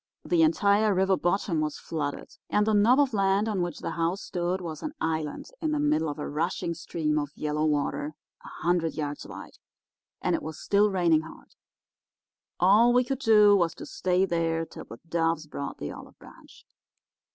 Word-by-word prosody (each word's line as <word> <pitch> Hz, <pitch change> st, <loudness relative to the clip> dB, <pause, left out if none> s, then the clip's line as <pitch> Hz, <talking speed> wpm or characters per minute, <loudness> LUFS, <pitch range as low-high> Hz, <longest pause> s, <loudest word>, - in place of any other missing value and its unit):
The 345 Hz, -2 st, +2 dB
entire 215 Hz, -, +3 dB
river 190 Hz, +1 st, +3 dB
bottom 175 Hz, -2 st, 0 dB
was 150 Hz, -1 st, -2 dB
flooded, 145 Hz, -3 st, -4 dB, 0.2 s
and 210 Hz, -, +2 dB
the 220 Hz, -, +1 dB
knob 225 Hz, +6 st, +5 dB
of 275 Hz, -4 st, +2 dB
land 195 Hz, +1 st, +2 dB
on 205 Hz, -4 st, -1 dB
which 175 Hz, -3 st, -4 dB
the -, -, -3 dB
house 170 Hz, +4 st, -1 dB
stood 175 Hz, +1 st, -2 dB
was 165 Hz, -4 st, -6 dB
an 305 Hz, -, -5 dB
island 160 Hz, -, -3 dB
in 310 Hz, -1 st, 0 dB
the 300 Hz, -, 0 dB
middle 295 Hz, -, +1 dB
of 145 Hz, -, -5 dB
a 150 Hz, -, -4 dB
rushing 170 Hz, +3 st, -2 dB
stream 155 Hz, -2 st, -2 dB
of 145 Hz, -1 st, -3 dB
yellow 150 Hz, 0 st, -1 dB
water 150 Hz, 0 st, -1 dB, 0.3 s
a -, -, -11 dB, 0.2 s
hundred 170 Hz, -1 st, +1 dB
yards 145 Hz, -2 st, -4 dB
wide. -, -, -11 dB, 0.6 s
And -, -, 0 dB
it -, -, 0 dB
was 155 Hz, 0 st, -7 dB
still 205 Hz, +1 st, +3 dB
raining 175 Hz, -5 st, +3 dB
hard. 160 Hz, -, -13 dB, 1.1 s
All 210 Hz, +7 st, +5 dB
we 250 Hz, +1 st, +4 dB
could 270 Hz, +1 st, -3 dB
do 210 Hz, -5 st, +6 dB
was 170 Hz, -4 st, +1 dB
to -, -, -9 dB
stay 185 Hz, +1 st, +1 dB
there 165 Hz, -2 st, -1 dB
till -, -, -11 dB
the 115 Hz, -, -10 dB
doves 165 Hz, -1 st, 0 dB
brought 140 Hz, -2 st, -6 dB
in -, -, -4 dB
the -, -, -6 dB
olive -, -, -12 dB
branch. -, -, -17 dB
175 Hz, 190 wpm, -27 LUFS, 160-210 Hz, 1.1 s, do